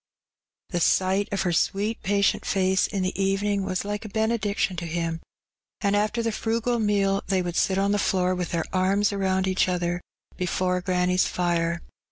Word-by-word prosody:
The 175 Hz, -, 0 dB
sight 190 Hz, +4 st, +2 dB
of 200 Hz, -, 0 dB
her 175 Hz, -, 0 dB
sweet 205 Hz, +6 st, 0 dB
patient 200 Hz, 0 st, +1 dB
face 190 Hz, -1 st, +2 dB
in 195 Hz, -3 st, -2 dB
the 185 Hz, +1 st, -2 dB
evening 195 Hz, +1 st, +1 dB
was 185 Hz, 0 st, -2 dB
like 205 Hz, +1 st, -3 dB
a 215 Hz, -, -7 dB
benediction 215 Hz, -3 st, 0 dB
to 170 Hz, 0 st, -4 dB
him, 165 Hz, 0 st, -2 dB, 0.6 s
and 200 Hz, -1 st, +1 dB
after 215 Hz, +3 st, 0 dB
the 230 Hz, -, 0 dB
frugal 230 Hz, +2 st, -1 dB
meal 200 Hz, -2 st, +2 dB
they 190 Hz, -2 st, +1 dB
would 175 Hz, -1 st, -4 dB
sit 190 Hz, +1 st, +2 dB
on 200 Hz, +1 st, +2 dB
the 205 Hz, -, +1 dB
floor 185 Hz, -2 st, +1 dB
with 180 Hz, -2 st, -3 dB
their 170 Hz, -2 st, -1 dB
arms 195 Hz, +2 st, +2 dB
around 190 Hz, -1 st, 0 dB
each 185 Hz, 0 st, +2 dB
other 175 Hz, -1 st, -1 dB, 0.4 s
before 180 Hz, 0 st, 0 dB
granny's 180 Hz, 0 st, +2 dB
fire. 170 Hz, -1 st, 0 dB
190 Hz, 180 wpm, -25 LUFS, 180-205 Hz, 0.6 s, sight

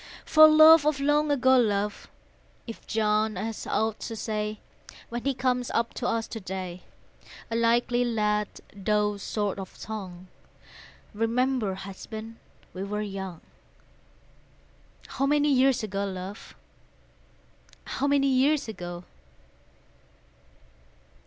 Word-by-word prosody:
For 310 Hz, 0 st, +8 dB
love 310 Hz, 0 st, +8 dB
of 300 Hz, -2 st, +1 dB
long 295 Hz, +2 st, +2 dB
ago, 260 Hz, -2 st, +4 dB
love, 210 Hz, -3 st, -1 dB, 0.6 s
If 230 Hz, -, -10 dB
John 215 Hz, 0 st, +1 dB
has 215 Hz, +4 st, -5 dB
aught 220 Hz, -1 st, -1 dB
to 225 Hz, -, -6 dB
say, 215 Hz, -1 st, -3 dB, 0.5 s
When 240 Hz, 0 st, -5 dB
he 275 Hz, -1 st, +1 dB
comes 250 Hz, -1 st, 0 dB
up 230 Hz, 0 st, 0 dB
to 245 Hz, -, -3 dB
us 230 Hz, -2 st, -1 dB
to 225 Hz, -, -6 dB
day, 185 Hz, -2 st, -6 dB, 0.7 s
(A -, -, -1 dB
likely 240 Hz, +1 st, +2 dB
lad, 210 Hz, -3 st, 0 dB, 0.3 s
though 210 Hz, +1 st, 0 dB
short 205 Hz, -1 st, -2 dB
of 190 Hz, -, -9 dB
tongue,) 190 Hz, -4 st, -7 dB, 0.9 s
Remember, 225 Hz, -1 st, 0 dB
husband, 220 Hz, +4 st, -8 dB, 0.4 s
we 185 Hz, -, -5 dB
were 210 Hz, +1 st, -3 dB
young, 190 Hz, -4 st, -6 dB, 1.6 s
How 275 Hz, -, -2 dB
many 295 Hz, 0 st, +3 dB
years 260 Hz, -2 st, +3 dB
ago, 200 Hz, -1 st, -3 dB
love, 190 Hz, +1 st, -7 dB, 1.3 s
How 280 Hz, -, -2 dB
many 285 Hz, -1 st, +3 dB
years 270 Hz, +2 st, +2 dB
ago? 175 Hz, -4 st, -7 dB
220 Hz, 115 wpm, -27 LUFS, 200-255 Hz, 1.6 s, For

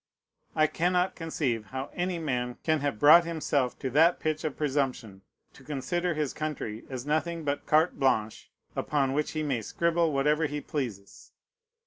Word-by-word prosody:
I 155 Hz, -, +4 dB
cannot 180 Hz, +3 st, +1 dB
conceive 140 Hz, -9 st, -2 dB
how 130 Hz, +6 st, -6 dB
any 180 Hz, 0 st, -1 dB
man 125 Hz, -6 st, -2 dB
can 155 Hz, -1 st, +2 dB
have 140 Hz, -5 st, -2 dB
brought 155 Hz, +7 st, +8 dB
himself 150 Hz, -6 st, -1 dB
to 130 Hz, -, -4 dB
that 165 Hz, +6 st, +4 dB
pitch 155 Hz, 0 st, -2 dB
of 155 Hz, -3 st, -3 dB
presumption, 130 Hz, -9 st, -2 dB, 0.3 s
to 135 Hz, -, -16 dB
consider 165 Hz, +5 st, -2 dB
his 150 Hz, -3 st, -1 dB
country 145 Hz, -8 st, -4 dB
as 130 Hz, -1 st, -5 dB
nothing 160 Hz, +2 st, -1 dB
but 145 Hz, -1 st, -2 dB
carte 155 Hz, +2 st, +3 dB
blanche, 110 Hz, -6 st, 0 dB, 0.3 s
upon 135 Hz, -3 st, 0 dB
which 150 Hz, +1 st, -1 dB
he 155 Hz, -1 st, -2 dB
may 135 Hz, -6 st, -1 dB
scribble 170 Hz, +7 st, +1 dB
whatever 150 Hz, +3 st, +2 dB
he 150 Hz, 0 st, -4 dB
pleases. 120 Hz, -10 st, -6 dB
150 Hz, 160 wpm, -28 LUFS, 130-160 Hz, 0.3 s, brought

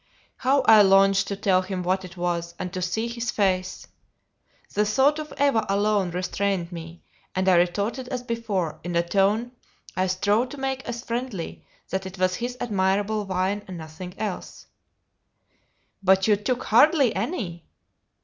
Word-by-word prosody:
How 270 Hz, +2 st, +2 dB
I 220 Hz, -4 st, +8 dB
longed 195 Hz, 0 st, +5 dB
to 200 Hz, -, -2 dB
tell 190 Hz, -2 st, +2 dB
him 185 Hz, -1 st, -4 dB
what 185 Hz, +2 st, 0 dB
it 180 Hz, 0 st, -11 dB
was, 170 Hz, -1 st, -2 dB
and 185 Hz, 0 st, -5 dB
to 185 Hz, -, -3 dB
see 200 Hz, +6 st, -1 dB
his 235 Hz, 0 st, -4 dB
face! 185 Hz, -4 st, 0 dB, 0.9 s
The 210 Hz, -, +2 dB
thought 270 Hz, +8 st, +3 dB
of 305 Hz, 0 st, -6 dB
Eva 280 Hz, -6 st, +3 dB
alone 200 Hz, -1 st, +2 dB
restrained 180 Hz, 0 st, -2 dB
me, 165 Hz, 0 st, -9 dB, 0.3 s
and 185 Hz, 0 st, 0 dB
I 190 Hz, -, +6 dB
retorted 200 Hz, +9 st, +1 dB
as 250 Hz, -1 st, -4 dB
before, 200 Hz, -10 st, -2 dB
in 175 Hz, 0 st, -4 dB
a 170 Hz, 0 st, +1 dB
tone 205 Hz, +6 st, +2 dB, 0.4 s
I 185 Hz, 0 st, +1 dB
strove 205 Hz, +6 st, +1 dB
to 290 Hz, -, -9 dB
make 265 Hz, -1 st, -3 dB
as 240 Hz, 0 st, -5 dB
friendly, 235 Hz, -7 st, -4 dB, 0.3 s
that 190 Hz, 0 st, -2 dB
it 190 Hz, +1 st, -10 dB
was 185 Hz, 0 st, +2 dB
his 245 Hz, +1 st, -4 dB
admirable 205 Hz, -1 st, 0 dB
wine 190 Hz, +2 st, -1 dB
and 185 Hz, -2 st, -7 dB
nothing 165 Hz, +3 st, -9 dB
else. 205 Hz, -4 st, -5 dB, 1.4 s
"But 190 Hz, +1 st, +4 dB
you 210 Hz, -, +5 dB
took 240 Hz, +5 st, -2 dB
hardly 275 Hz, +2 st, +4 dB
any." 190 Hz, -, -4 dB
195 Hz, 160 wpm, -25 LUFS, 185-230 Hz, 1.4 s, I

